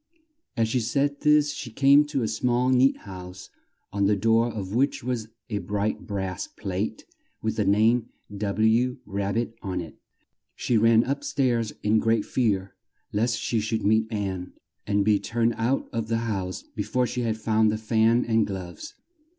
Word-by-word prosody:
As 115 -1 +2
she 125 +3 0
said 140 +5 0
this 150 -1 +4
she 135 -4 -6
came 140 +5 +5
to 145 -4 -2
a - - 0
small 120 +3 +1
neat 130 +1 +4
house 95 -1 -9 0.4
on 100 -1 +2
the 105 - +3
door 115 +3 +2
of 100 -3 -5
which 135 +2 +1
was 120 -3 -2 0.2
a 105 -2 -2
bright 105 +1 -2
brass 95 -2 -3
plate 100 +1 -4 0.4
with - - -1
the - - 0
name 110 +4 +3 0.3
W. 110 +5 +1
Rab 100 0 -2
bit 115 0 -1
on 95 -3 -3
it. 85 -3 -8 0.6
She 120 - -1
ran 115 +1 +5
up 140 +2 -2
stairs 120 -5 0
in 110 +1 +3
great 115 -1 +1
fear 100 -6 0 0.4
lest 115 +3 +1
she 115 - 0
should 110 0 -2
meet 110 +2 +2
Ann 95 -4 -3 0.3
and 100 -1 +1
be 105 -1 +4
turned 115 0 0
out 120 +4 0
of 115 -1 -2
the 115 0 0
house 95 -4 -3
be 105 - -7
fore 125 +5 0
she 125 0 -3
had 115 -2 -1
found 110 0 +2
the 110 - -1
fan 110 +2 +2
and 115 -1 +2
gloves. 95 - -7
110 Hz, 175 wpm, -25 LUFS, 100-120 Hz, 0.6 s, came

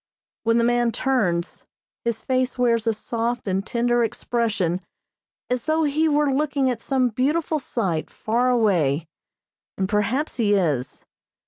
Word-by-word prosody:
When 230 +1 +3
the 235 - +3
man 240 0 +2
turns, 185 -11 -1 0.4
his 235 -1 -2
face 255 -1 0
wears 235 -2 +2
a - - +5
soft 235 +2 -3
and 190 0 0
tender 240 +2 +1
expression 220 -6 -1 0.7
as 250 -1 -2
though 315 +1 +2
he 310 +2 +2
were 295 -2 +2
looking 280 -2 +1
at 235 -2 -5
some 260 -2 +1
beautiful 300 +7 0
sight 190 - -2
far 240 +3 0
away, 175 - +2 0.7
and, 190 - 0
perhaps, 210 +10 0
he 210 -4 +3
is. 150 -10 -1
235 Hz, 140 wpm, -23 LUFS, 205-260 Hz, 0.7 s, a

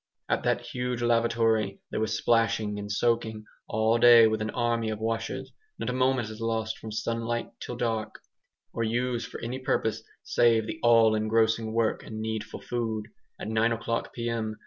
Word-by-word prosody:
At - - +1
that - - +2
huge 125 -1 -3
lavatory 115 -3 +2
there - - -2
was 110 0 0
splashing 110 -3 +1
and 105 0 -5
soaking 110 -1 0 0.2
all 110 +2 +2
day 120 -1 +8
with 110 0 +1
an 110 - -1
army 115 -1 0
of 110 - -3
washers; 115 +1 -3 0.2
not - - -2
a - - -3
moment 130 -3 +1
is 110 +1 -9
lost 115 -1 -2
from 110 - -8 0.2
daylight 115 0 -2
till 125 - -6
dark, 110 -2 -2 0.6
or 115 - -3
used 120 +1 -1
for - - -8
any 120 +3 -4
purpose 110 -4 0 0.2
save 115 -2 +3
the 110 - -6
all 115 -2 +5
engrossing 110 +1 +1
work 115 -1 0
and 110 - -7
needful 110 -1 -4
food. 110 -3 -3 0.3
At - - -5
nine 110 +1 +2
o'clock 115 0 -2
p.m. 115 -2 -3
115 Hz, 170 wpm, -27 LUFS, 110-120 Hz, 0.6 s, day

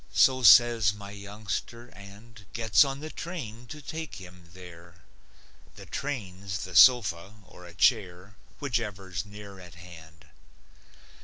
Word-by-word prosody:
So 130 -1 +4
says 115 -2 +6
my 100 -1 -10
youngster, 105 +3 -7
and 100 +4 -15
Gets 115 +2 +4
on 135 0 -5
the 155 +1 -7
train 125 -9 -8
to 150 +1 -10
take 160 -1 -7
him 90 -2 -13
there 85 -2 -14 0.7
(The - - -12
train's 95 -9 -5
the 90 -1 -9
sofa 100 -3 +5
or 90 -1 -15
a 85 - -15
chair, 95 -2 0 0.3
Whichever's 105 - -4
near 100 -1 -12
at 90 -2 -14
hand.) 85 -2 -15
100 Hz, 130 wpm, -27 LUFS, 90-120 Hz, 0.7 s, says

